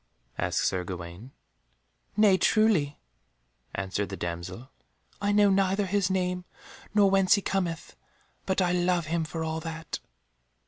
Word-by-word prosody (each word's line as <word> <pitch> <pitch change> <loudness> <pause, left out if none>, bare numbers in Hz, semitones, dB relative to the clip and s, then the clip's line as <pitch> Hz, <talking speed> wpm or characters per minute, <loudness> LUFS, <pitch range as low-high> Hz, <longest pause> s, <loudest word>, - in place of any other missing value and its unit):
asked - - 0
Sir 90 -1 0
Gawaine. 90 +5 -7 0.9
"Nay, 210 -3 +6
truly," 190 -8 +3 0.8
answered 100 +1 -2
the 95 - -5
damsel, 90 +9 -5 0.5
"I 205 0 +1
know 205 -1 +5
neither 195 +1 +2
his 195 0 +1
name, 180 -1 0 0.5
nor 205 -1 +6
whence 195 -1 +5
he 200 - -1
cometh, 175 -4 -2 0.5
but 190 0 +2
I 175 - +1
love 180 -1 +1
him 165 +1 0
for 160 +1 -4
all 160 0 -2
that." 160 -1 -5
175 Hz, 135 wpm, -28 LUFS, 130-195 Hz, 0.9 s, Nay